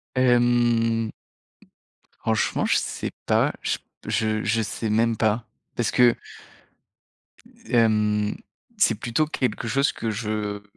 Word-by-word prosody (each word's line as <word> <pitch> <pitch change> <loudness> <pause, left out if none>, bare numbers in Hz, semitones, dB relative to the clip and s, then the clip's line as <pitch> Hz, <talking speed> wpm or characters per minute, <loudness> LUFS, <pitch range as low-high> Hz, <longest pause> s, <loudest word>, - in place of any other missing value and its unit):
Hem, 120 -2 +3 1.1
franchement, 110 -1 0
je - - +2
sais - - -3
pas, - - +2
je - - -1 0.2
p - - -9 0.3
je 110 +2 +1
sais 110 +1 -4
même 115 +2 +2
pas 110 +1 0 0.3
parce 120 - 0
que 120 -2 +5 1.5
hem, 105 -2 +2 0.4
c'est 195 - +3
plutôt 120 +7 -1
quelque 125 -5 -2
chose 135 +4 +2
que 115 - -3
je, 110 0 -3
heu, 105 -1 -3
115 Hz, 115 wpm, -24 LUFS, 110-120 Hz, 1.5 s, que